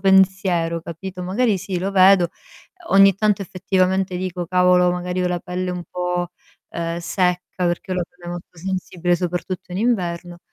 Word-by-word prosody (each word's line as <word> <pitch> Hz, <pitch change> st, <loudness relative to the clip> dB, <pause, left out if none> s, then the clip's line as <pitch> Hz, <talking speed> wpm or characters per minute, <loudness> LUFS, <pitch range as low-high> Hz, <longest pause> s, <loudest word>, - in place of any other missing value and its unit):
pensiero, 190 Hz, -3 st, +3 dB
capito. 180 Hz, +3 st, -7 dB
Magari 200 Hz, +2 st, +1 dB
sì, 180 Hz, 0 st, -3 dB
lo 190 Hz, +2 st, -2 dB
vedo, 190 Hz, -2 st, +6 dB, 0.6 s
ogni 195 Hz, -1 st, +7 dB
tanto 205 Hz, -1 st, +1 dB
effettivamente 185 Hz, 0 st, 0 dB
dico: 180 Hz, -1 st, -3 dB
"Cavolo, 180 Hz, 0 st, +4 dB
magari 180 Hz, +1 st, -2 dB
ho 180 Hz, -, +1 dB
la 175 Hz, -1 st, -2 dB
pelle 180 Hz, +1 st, -3 dB
un 180 Hz, -1 st, -4 dB
po', 180 Hz, -1 st, -2 dB, 0.4 s
uhm, 170 Hz, 0 st, -3 dB
secca" 180 Hz, +1 st, 0 dB, 0.2 s
ma 180 Hz, -, +2 dB
perché 175 Hz, +2 st, -2 dB
ho 185 Hz, -, 0 dB
la 180 Hz, -, +1 dB
pelle 175 Hz, -1 st, -10 dB
molto 175 Hz, 0 st, -8 dB
sensibile 180 Hz, 0 st, -1 dB
soprattutto 180 Hz, +1 st, -4 dB
in 180 Hz, -, -3 dB
inverno, 175 Hz, -6 st, -1 dB
180 Hz, 165 wpm, -21 LUFS, 175-190 Hz, 0.6 s, ogni